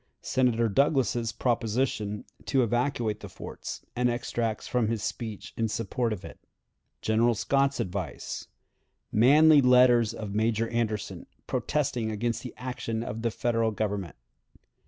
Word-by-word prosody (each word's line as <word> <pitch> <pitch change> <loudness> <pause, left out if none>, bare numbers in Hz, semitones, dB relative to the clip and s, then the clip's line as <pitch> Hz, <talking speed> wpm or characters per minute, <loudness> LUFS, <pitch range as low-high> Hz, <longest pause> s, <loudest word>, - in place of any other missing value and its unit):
Senator 120 -3 +2
Douglas's 120 -1 +2
Proposition 115 -3 -1 0.2
to 135 -3 +2
evacuate 120 -2 0
the - - -9
Forts, - - -8
and 125 0 +2
Extracts 120 -2 -2
from 125 -3 +1
his 115 -1 -2
Speech 110 -4 -5
in 115 - 0
Support 115 +2 -1
of 105 -4 -5
it. - - -11 0.6
General 115 +2 +3
Scott's 140 +5 +1
Advice. 95 +1 -4 0.6
Manly 145 +6 +6
Letter 125 -1 +6 0.2
of 105 -2 -5
Major 110 +1 +1
Anderson, 110 -3 -2 0.2
protesting 130 -6 -1
against 115 +1 -2
the 125 - -8
Action 120 -2 -4
of 110 0 -5
the 115 - +1
Federal 115 0 0
Government. 100 -4 -3
115 Hz, 130 wpm, -28 LUFS, 110-125 Hz, 0.6 s, Manly